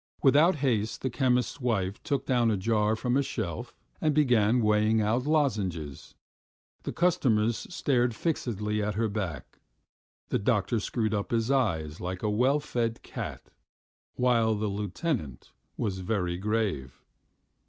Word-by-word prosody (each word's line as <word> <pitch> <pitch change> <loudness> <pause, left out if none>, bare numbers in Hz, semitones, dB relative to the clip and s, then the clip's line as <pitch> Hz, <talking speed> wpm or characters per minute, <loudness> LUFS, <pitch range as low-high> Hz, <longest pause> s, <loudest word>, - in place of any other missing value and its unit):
Without 150 +7 +5
haste 110 -4 0
the 130 - -1
chemist's 125 +1 +1
wife 100 -5 -1
took 140 -3 -2
down 120 -3 +2
a 105 - +1
jar 105 +2 +1
from 125 +2 -1
a 140 - +4
shelf 100 - -4 0.3
and 155 -2 +2
began 125 -5 +4
weighing 105 0 +3
out 115 +5 +1
lozenges. 100 - -1 0.7
The - - -4
customers 120 -11 +1
stared 125 -8 +1
fixedly 105 - -1
at 105 -1 -2
her 115 +1 +1
back; 95 -9 -5 0.7
the - - +1
doctor 105 0 +1
screwed 110 +1 -1
up 100 -1 -2
his 115 +2 0
eyes 85 - 0
like 90 +2 -4
a 105 - +1
well 130 +7 +3
fed 120 -6 -2
cat, - - -7 0.6
while 115 -3 +2
the 105 0 -1
lieutenant 100 - -3 0.3
was 95 -4 -2
very 90 -2 -1
grave. 95 - -2
110 Hz, 140 wpm, -28 LUFS, 100-125 Hz, 0.7 s, Without